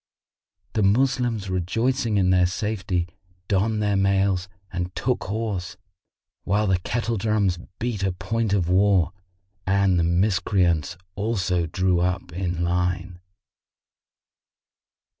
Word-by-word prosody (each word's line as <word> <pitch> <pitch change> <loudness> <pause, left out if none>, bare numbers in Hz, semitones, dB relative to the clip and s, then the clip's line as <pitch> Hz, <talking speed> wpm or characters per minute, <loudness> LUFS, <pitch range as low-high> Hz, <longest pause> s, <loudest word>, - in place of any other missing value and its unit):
The 110 - +1
Moslems, 120 0 +2
rejoicing 115 +6 0
in 95 -2 +3
their 90 -1 +4
safety, 95 -3 -2 0.4
donned 105 +2 +1
their 105 -1 +1
mails 95 -1 +1 0.2
and 90 0 -3
took 125 +2 -1
horse, 100 -4 -3 0.7
while 105 +2 +1
the 95 -3 +2
kettle 115 +4 -2
drums 100 -4 +1 0.2
beat 120 -4 -2
a 95 -1 +1
point 105 +4 -2
of 95 -4 +1
war; 95 -1 +3 0.5
and 95 -2 +3
the - - +2
Miscreants 90 -3 +1 0.2
also 95 -5 0
drew 90 +1 +1
up 90 -1 -1
in 90 -1 -2
line. 90 0 -1
95 Hz, 115 wpm, -24 LUFS, 90-105 Hz, 0.7 s, their